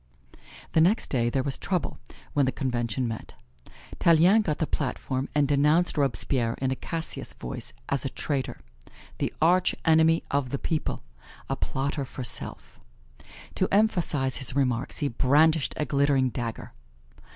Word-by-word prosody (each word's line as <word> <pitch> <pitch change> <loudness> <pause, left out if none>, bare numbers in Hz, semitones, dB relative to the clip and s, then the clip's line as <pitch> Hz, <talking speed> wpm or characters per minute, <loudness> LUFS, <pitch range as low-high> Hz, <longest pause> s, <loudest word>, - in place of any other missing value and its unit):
The 160 - +4
next 190 +8 +2
day 120 -3 +1
there 130 +2 0
was 135 -1 -3
trouble 180 -3 -2 0.3
when 145 -3 +2
the - - +2
Convention 125 -3 -2
met. 115 -1 -7 0.6
Tallien 170 +6 +5
got 155 -8 -1
the 160 - 0
platform 130 -2 -2
and 145 -1 +3
denounced 150 +5 +3
Robespierre 125 - 0
in 130 0 -2
a - - 0
Cassius 165 +4 -5
voice - - -4 0.2
as 140 - -1
a 135 - -2
traitor 130 +2 -3 0.6
the - - -1
arch 180 +2 +3
enemy 160 0 +4
of 140 -2 0
the 140 - -2
people 155 +2 -2 0.5
a - - +1
plotter 140 +1 -2
for 130 0 -7
self. 120 - -4 0.7
To 185 - +1
emphasize 175 - +2
his 135 -1 +1
remarks 130 -2 0
he - - +3
brandished 145 +5 +3
a 150 - 0
glittering 140 -2 +2
dagger. 115 -2 -5
140 Hz, 150 wpm, -27 LUFS, 130-160 Hz, 0.7 s, Tallien